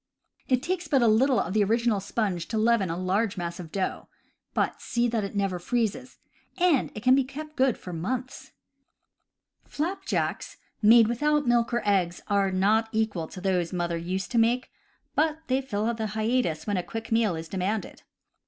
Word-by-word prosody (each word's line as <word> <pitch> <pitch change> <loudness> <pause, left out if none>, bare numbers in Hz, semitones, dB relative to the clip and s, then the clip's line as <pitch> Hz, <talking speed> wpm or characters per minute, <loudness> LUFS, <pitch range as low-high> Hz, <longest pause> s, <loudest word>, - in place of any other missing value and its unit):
It 255 0 +1
takes 360 -1 -2
but 275 -4 +3
little 240 +4 +4
of 185 - -2
the 215 -1 +3
original 225 0 +1
sponge 200 -3 -2
to 225 - -2
leaven 220 -4 +2
a 165 - -2
large 190 +3 0
mass 170 0 -4
of 165 -3 -8
dough 190 -2 -3 0.5
(but - - 0
see 240 -1 0
that 230 -2 -1
it 200 +1 -5
never 195 -3 0
freezes), 240 +5 -2 0.4
and 350 -7 +2
it 215 - -7
can 255 +1 +6
be 270 0 +4
kept 300 +4 -8
good 260 -3 +2
for 180 - -8
months. 255 +10 -4 1.2
Flapjacks 340 +6 -2 0.2
made 225 +1 +7
without 295 +5 +1
milk 240 0 +2
or 240 -1 0
eggs 180 -4 +1
are 200 -1 +2
not 210 +4 +2
equal 215 -7 -1
to 185 - -10
those 180 -3 0
that 180 - -4
mother 170 -1 -1
used 180 +3 -3
to 235 - +2
make, 240 +3 +1 0.4
but 310 0 +1
they 265 -2 +1
fill 225 -3 -1
the 220 -1 -3
hiatus 215 -7 -1
when 205 -2 -1
a - - +1
quick 225 +3 -7
meal 225 -5 +2
is 160 0 -6
demanded. 195 +4 -3
220 Hz, 180 wpm, -27 LUFS, 190-250 Hz, 1.2 s, made